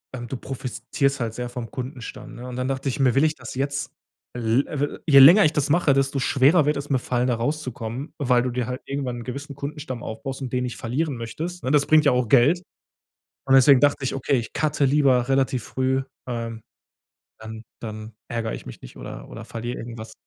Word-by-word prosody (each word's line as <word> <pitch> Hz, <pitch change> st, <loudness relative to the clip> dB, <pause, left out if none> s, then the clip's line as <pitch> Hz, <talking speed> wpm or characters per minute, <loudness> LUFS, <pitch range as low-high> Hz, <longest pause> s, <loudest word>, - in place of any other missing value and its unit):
ähm, 120 Hz, -1 st, -6 dB
du 130 Hz, -, -4 dB
profitierst 135 Hz, +2 st, -2 dB
halt 115 Hz, -2 st, -3 dB
sehr 125 Hz, 0 st, -4 dB
vom 120 Hz, -2 st, -6 dB
Kundenstamm, 130 Hz, 0 st, -7 dB
ne? 125 Hz, +1 st, -8 dB
Und 125 Hz, -, -6 dB
dann 125 Hz, 0 st, -2 dB
dacht 135 Hz, -1 st, -2 dB
ich, 135 Hz, -, -2 dB
mir: 130 Hz, -3 st, +4 dB
„Will 135 Hz, +3 st, +3 dB
ich 155 Hz, 0 st, +1 dB
das 125 Hz, -3 st, -9 dB
jetzt?“ 140 Hz, +1 st, -2 dB, 0.4 s
L 120 Hz, +2 st, +1 dB
we 145 Hz, -1 st, -3 dB
je 140 Hz, -4 st, +7 dB
länger 170 Hz, +10 st, +9 dB
ich 155 Hz, -, +2 dB
das 150 Hz, -1 st, 0 dB
mache, 155 Hz, -3 st, +3 dB
desto 135 Hz, 0 st, +1 dB
schwerer 145 Hz, +4 st, +4 dB
wird 150 Hz, 0 st, +1 dB
es 140 Hz, +1 st, -6 dB
mir 135 Hz, -, +3 dB
fallen 125 Hz, 0 st, -1 dB
da 125 Hz, -, +1 dB
rauszukommen, 130 Hz, 0 st, -4 dB
weil 125 Hz, -4 st, +3 dB
du 125 Hz, -, -1 dB
dir 125 Hz, 0 st, -2 dB
halt 125 Hz, +2 st, -5 dB
irgendwann 135 Hz, -3 st, -3 dB
'n 120 Hz, -, -7 dB
gewissen 140 Hz, +3 st, -7 dB
Kundenstamm 140 Hz, -3 st, -6 dB
aufbaust 135 Hz, +5 st, -6 dB
und 130 Hz, -, -4 dB
den 125 Hz, 0 st, 0 dB
nicht 125 Hz, -1 st, -4 dB
verlieren 140 Hz, +5 st, -2 dB
möchtest, 160 Hz, +10 st, -6 dB
ne? 130 Hz, -, -1 dB
Das 145 Hz, 0 st, +3 dB
bringt 155 Hz, -1 st, +5 dB
ja 140 Hz, -, +6 dB
auch 125 Hz, -1 st, +1 dB
Geld. 140 Hz, +9 st, +4 dB, 0.8 s
Und 135 Hz, 0 st, +4 dB
deswegen 135 Hz, 0 st, +7 dB
dachte 145 Hz, -2 st, +2 dB
ich: -, -, -1 dB
„Okay, 135 Hz, 0 st, +1 dB
ich 115 Hz, -, -7 dB
cutte 150 Hz, -2 st, +1 dB
lieber 130 Hz, -3 st, +3 dB
relativ 135 Hz, -3 st, +1 dB
früh, 130 Hz, 0 st, 0 dB, 0.2 s
ähm, 115 Hz, -2 st, -5 dB, 0.8 s
dann 110 Hz, 0 st, -8 dB, 0.2 s
dann 110 Hz, 0 st, -7 dB, 0.2 s
ärger 115 Hz, -1 st, -2 dB
ich -, -, -8 dB
mich 60 Hz, -, -10 dB
nicht -, -, -12 dB
oder -, -, -9 dB
oder -, -, -9 dB
verliere 120 Hz, +2 st, -5 dB
irgendwas.“ 115 Hz, -1 st, -8 dB
130 Hz, 215 wpm, -24 LUFS, 120-140 Hz, 0.8 s, länger